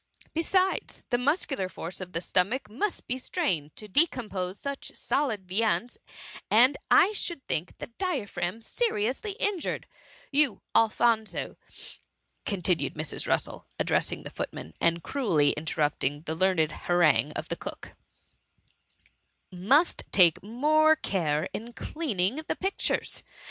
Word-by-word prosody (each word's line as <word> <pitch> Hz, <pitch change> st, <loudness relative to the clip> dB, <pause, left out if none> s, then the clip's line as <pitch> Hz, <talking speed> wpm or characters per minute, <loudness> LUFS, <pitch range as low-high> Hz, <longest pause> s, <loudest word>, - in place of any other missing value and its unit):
Besides, 370 Hz, +4 st, 0 dB
the 245 Hz, -, +2 dB
muscular 275 Hz, -, 0 dB
force 170 Hz, +1 st, -7 dB
of 180 Hz, -1 st, -7 dB
the 165 Hz, -, -2 dB
stomach 195 Hz, +7 st, 0 dB
must 355 Hz, -, -2 dB
be 255 Hz, +1 st, -2 dB
strained 175 Hz, -, -1 dB
to 215 Hz, -, -8 dB
decompose 205 Hz, -, +2 dB
such 280 Hz, +2 st, -5 dB
solid 220 Hz, -10 st, -1 dB
viands, 225 Hz, +5 st, 0 dB, 0.5 s
and 250 Hz, +6 st, +6 dB
I 400 Hz, -, +6 dB
should 345 Hz, -8 st, -4 dB
think 165 Hz, +3 st, -2 dB
the -, -, -6 dB
dia 290 Hz, -, -3 dB
phragm 180 Hz, +4 st, -4 dB
seriously 390 Hz, -, -1 dB
injured—* 405 Hz, -4 st, -2 dB, 0.3 s
" -, -, -25 dB
You, 280 Hz, -5 st, +3 dB
Alphonso,^ 225 Hz, 0 st, +2 dB, 0.9 s
continued 180 Hz, -3 st, 0 dB
Mrs. 155 Hz, 0 st, -2 dB
Russel, -, -, -1 dB
addressing -, -, +1 dB
the -, -, -8 dB
footman, 80 Hz, -, -6 dB
and 170 Hz, 0 st, +2 dB
cruelly 170 Hz, -, +2 dB
interrupt 150 Hz, -1 st, -1 dB
ing 145 Hz, +2 st, -1 dB
the 160 Hz, -, -3 dB
learned 165 Hz, -2 st, +2 dB
harangue 155 Hz, -7 st, +2 dB
of -, -, -5 dB
the -, -, -1 dB
cook, -, -, -8 dB, 1.6 s
'^ -, -, -9 dB
must 270 Hz, -, +3 dB
take 175 Hz, -5 st, +5 dB
more 305 Hz, +9 st, +3 dB
care 165 Hz, -, -1 dB
in 235 Hz, +2 st, -6 dB
cleaning 235 Hz, -, -2 dB
the -, -, -1 dB
pictures. 385 Hz, +1 st, -1 dB
215 Hz, 135 wpm, -28 LUFS, 175-285 Hz, 1.6 s, and